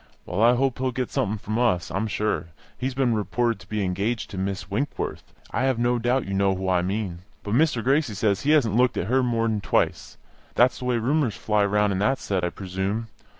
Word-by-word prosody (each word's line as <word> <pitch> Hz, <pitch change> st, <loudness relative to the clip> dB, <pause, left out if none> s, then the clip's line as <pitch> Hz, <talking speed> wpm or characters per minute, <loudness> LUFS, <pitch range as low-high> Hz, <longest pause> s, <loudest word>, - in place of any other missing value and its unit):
Well, 90 Hz, +4 st, -2 dB
I 120 Hz, +2 st, +6 dB
hope 130 Hz, 0 st, 0 dB
he'll 130 Hz, 0 st, 0 dB
get 125 Hz, 0 st, -3 dB
something 105 Hz, +2 st, 0 dB
from 110 Hz, +3 st, -3 dB
us, 90 Hz, -8 st, +1 dB
I'm 110 Hz, +3 st, -1 dB
sure. 105 Hz, -4 st, -1 dB, 0.3 s
He 130 Hz, -, -2 dB
has 130 Hz, -, -5 dB
been 130 Hz, -3 st, +2 dB
reported 110 Hz, +2 st, 0 dB
to 100 Hz, -, -16 dB
be 105 Hz, -1 st, -1 dB
engaged 100 Hz, +5 st, -2 dB
to 95 Hz, -, -6 dB
Miss 95 Hz, -1 st, -3 dB
Winkworth; 120 Hz, +9 st, -3 dB, 0.2 s
I -, -, 0 dB
have 130 Hz, -3 st, +1 dB
no 120 Hz, +1 st, +1 dB
doubt 125 Hz, +3 st, +1 dB
you 100 Hz, -, -4 dB
know 95 Hz, 0 st, +2 dB
who 95 Hz, 0 st, -4 dB
I 90 Hz, -1 st, +3 dB
mean. 95 Hz, -1 st, -2 dB, 0.2 s
But 105 Hz, -, -3 dB
Mr. 135 Hz, -3 st, +2 dB
Gracie 135 Hz, -3 st, +1 dB
says 100 Hz, 0 st, +1 dB
he 145 Hz, -, -1 dB
hasn't 135 Hz, -9 st, +4 dB
looked 125 Hz, 0 st, +3 dB
at -, -, -1 dB
her 130 Hz, +2 st, +3 dB
more 115 Hz, -2 st, +1 dB
than 110 Hz, -2 st, -1 dB
twice. -, -, 0 dB, 0.4 s
That's 125 Hz, +2 st, +4 dB
the 125 Hz, -, -6 dB
way 125 Hz, -1 st, +1 dB
rumours 125 Hz, -1 st, +1 dB
fly 105 Hz, -1 st, +1 dB
round 105 Hz, 0 st, +2 dB
in 95 Hz, -, -1 dB
that 130 Hz, +7 st, +2 dB
set, 95 Hz, -3 st, -2 dB
I 90 Hz, -, +1 dB
presume. 95 Hz, +5 st, -3 dB
110 Hz, 235 wpm, -25 LUFS, 100-125 Hz, 0.4 s, I